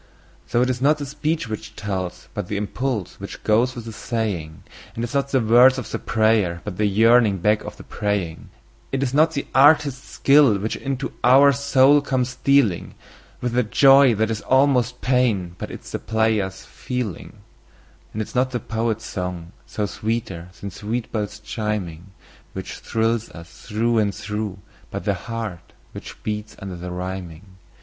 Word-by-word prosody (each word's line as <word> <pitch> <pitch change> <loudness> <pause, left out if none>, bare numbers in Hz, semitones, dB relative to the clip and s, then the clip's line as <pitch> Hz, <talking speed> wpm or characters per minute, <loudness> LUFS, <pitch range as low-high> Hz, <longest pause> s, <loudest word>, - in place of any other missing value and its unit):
So 120 +1 +2
it 125 - 0
is 125 0 -4
not 145 +3 +4
the 145 - -5
speech 150 +1 -2
which 110 -1 -7
tells, 95 -3 -4
but - - -4
the 105 - -3
impulse 110 0 -3
which - - -8
goes 120 +4 +2
with 120 -2 -7
the 115 - -7
saying; 105 -9 -3 0.3
And 115 - -3
it 120 - -3
is - - -10
not 140 0 0
the 135 - +2
words 125 +3 +6
of 125 - -6
the - - -2
prayer, 110 -6 +1
but 100 -4 -6
the 105 - +2
yearning 110 0 +4
back 105 +4 +1
of - - -8
the - - -11
praying. 100 -6 -3 0.4
It 135 0 0
is 130 -1 -2
not 155 +3 +4
the 140 - -2
artist's 140 -1 +4
skill 140 -6 +4
which 105 +3 -3
into 135 0 -4
our 135 +3 +7
soul 140 +1 +4
comes 130 -3 -1
stealing 130 -6 +1 0.5
With 120 -1 -2
a 125 - +4
joy 135 +2 +6
that 110 +2 0
is 110 - -3
almost 130 -2 +2
pain, 115 -9 +1
but - - -5
it - - -8
is - - -11
the - - -3
player's 110 -4 0
feeling. 125 - -5 0.7
And 110 - -3
it - - -10
is - - -13
not 130 +1 +2
the 125 -1 -3
poet's 110 0 -2
song, 90 -4 -5 0.2
though 105 - 0
sweeter 110 -5 -4
than 100 - -6
sweet 110 +5 -4
bells 105 -2 -3
chiming, 105 -6 -4 0.5
Which - - -7
thrills 115 0 -1
us 85 0 -13
through 115 +1 +1
and 100 -3 0
through, 105 0 -4 0.3
but - - -5
the - - +2
heart 115 -6 -6 0.2
which - - -10
beats 105 0 -4
under 95 -2 -7
the 90 +1 -7
rhyming. 90 -1 -6
110 Hz, 180 wpm, -22 LUFS, 100-130 Hz, 0.7 s, our